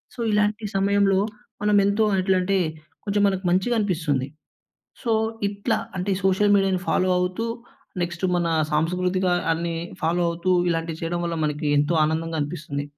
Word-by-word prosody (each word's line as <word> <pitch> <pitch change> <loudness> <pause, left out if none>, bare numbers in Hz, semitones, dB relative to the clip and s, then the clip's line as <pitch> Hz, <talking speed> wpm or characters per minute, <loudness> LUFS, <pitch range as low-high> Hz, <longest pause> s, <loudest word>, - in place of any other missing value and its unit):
So - - -14
ఇలాంటి 210 +1 +1
సమయంలో 195 0 +3 0.4
మనం 210 0 +3
ఎంతో 205 +2 +2 0.2
ఎట్లంటే 190 0 +2 0.5
కొంచెం 205 0 +1
మనకు 190 -1 -2
మంచిగనిపిస్తుంది. 180 - 0 0.8
సో 230 - +1 0.4
ఇట్లా 200 0 -1 0.2
అంటే, 180 +3 -2
సోషల్ 205 +2 +4
మీడియాను 190 -2 +1
ఫాలో 185 0 +2
అవుతూ 185 +5 -1 0.6
నెక్స్ట్ 170 +1 -6
మన 175 -1 0 0.3
సాంస్కృతికాన్ని 175 0 0 0.2
ఫాలో 170 +2 +1
అవుతూ 170 +2 -2 0.2
ఇలాంటివి 165 -1 -2
చేయడం 175 +1 -2
వల్ల 170 -1 -2
మనకి 150 0 -2
ఎంతో 145 +4 +1
ఆనందంగా 160 +1 -1
అనిపిస్తుంది. 145 -1 -4
180 Hz, 130 wpm, -24 LUFS, 165-200 Hz, 0.8 s, సోషల్